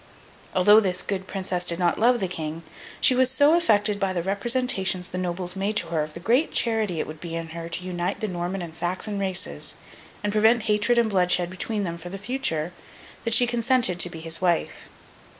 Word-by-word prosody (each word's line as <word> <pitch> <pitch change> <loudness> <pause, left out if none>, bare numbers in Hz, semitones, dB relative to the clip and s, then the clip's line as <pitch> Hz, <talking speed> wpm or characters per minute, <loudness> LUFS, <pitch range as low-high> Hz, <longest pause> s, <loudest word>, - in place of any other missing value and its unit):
Although 205 +4 +6
this 185 -4 -1
good 190 -2 -4
Princess 185 -2 -3
did 170 -1 +2
not 175 -1 +1
love 240 +2 +4
the 190 - -1
King, 160 -2 -6 0.4
she - - +5
was 255 0 +3
so 285 +4 +4
affected 210 -11 +3
by 195 -1 0
the 175 -2 -2
representations 195 -2 +1
the 180 - -5
nobles 180 0 -3
made 200 +2 -2
to 170 -6 -1
her 165 -2 0
of 150 0 -6
the - - -6
great 245 - +1
charity 220 -7 0
it - - -1
would 155 0 -9
be 165 0 -6
in 165 -1 -5
her 165 0 -7
to 175 +2 -3
unite 180 +1 -3
the 215 - -2
Norman 180 0 -4
and 165 -1 -9
Saxon 185 +4 -3
races, 180 - 0 0.5
and 205 0 -1
prevent 220 +2 +3
hatred 215 +2 +2
and 235 -1 +3
bloodshed 180 -2 +2
between 205 +3 -3
them 170 -2 -4
for 175 - -8
the 195 - -6
future, 195 - -2 0.5
that 230 - +1
she 245 - +5
consented 240 -5 +1
to 175 - +4
become 165 -2 -9
his 165 +1 -1
wife. 175 -2 -1
190 Hz, 210 wpm, -24 LUFS, 175-220 Hz, 0.5 s, Although